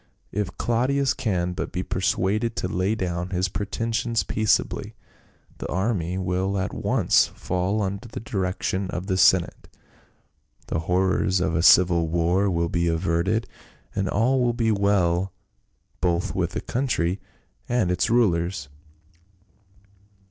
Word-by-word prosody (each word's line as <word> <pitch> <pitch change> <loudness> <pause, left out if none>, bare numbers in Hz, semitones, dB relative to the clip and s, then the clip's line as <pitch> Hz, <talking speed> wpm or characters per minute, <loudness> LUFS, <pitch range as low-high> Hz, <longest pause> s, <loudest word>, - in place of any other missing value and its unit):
If 100 -2 -3
Claudius 130 +3 +1
can 90 -5 -1
but - - -4
be 90 - -3
persuaded 100 +4 0
to - - -2
lay 95 +4 0
down 90 -3 -3
his 90 0 0
pretentions 110 +4 -1
peaceably, 110 -1 0 0.6
the - - -4
army 95 -2 -1
will 95 +1 -1
at 95 0 -2
once - - +2
fall 95 +4 -2
under 100 +4 -4
the 115 - -7
direc 95 -4 -3
tion 95 0 -1
of 90 +1 -4
the 95 -2 0
senate, 95 -1 +3 1.0
the - - -2
horrors 95 0 +2
of 90 -2 0
a 85 - +2
civil 85 -1 +5
war 85 +4 +1
will 85 -2 0
be 85 +1 0
averted, 85 +6 0 0.5
and 95 -2 -1
all 125 +6 +2
will 120 -1 +2
be 115 -2 +1
well 95 -3 +1 0.7
both 85 -1 0
with - - -1
the - - -3
country 105 -8 -1 0.5
and 120 -7 +1
its 90 0 +1
rulers." 85 - +1
95 Hz, 135 wpm, -24 LUFS, 90-110 Hz, 1.0 s, civil